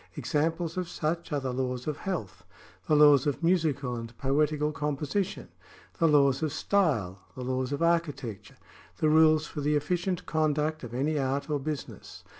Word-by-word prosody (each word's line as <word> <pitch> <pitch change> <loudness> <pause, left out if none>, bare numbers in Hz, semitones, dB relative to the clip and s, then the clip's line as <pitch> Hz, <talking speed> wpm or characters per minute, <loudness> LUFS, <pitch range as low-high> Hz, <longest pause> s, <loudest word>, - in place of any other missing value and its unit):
^ - - -25
Examples 165 +3 -1
of 180 -2 -2
such 165 +2 -3
are 145 - 0
the 130 -2 -3
laws 125 -1 -2
of 150 -2 -3
health, 100 - -5 0.4
the 155 - +3
laws 145 -2 +6
of 145 +3 -2
musical 155 -7 +1
and 115 0 -8
poetical 150 +2 +1
composition, 150 +7 -2 0.5
the 165 - +4
laws 140 -3 +4
of 155 -2 0
style, 130 - 0 0.2
the 130 - -6
laws 130 +1 -2
of 145 +3 -1
architecture, 145 - -1 0.4
the 155 - +2
rules 155 0 +5
for 150 - -6
the 150 +1 +1
efficient 175 +4 -1
conduct 155 0 0
of 120 -1 -7
any 145 +4 0
art 140 +2 -1
or 145 - +1
business. 150 +1 -6
150 Hz, 170 wpm, -28 LUFS, 135-160 Hz, 0.5 s, laws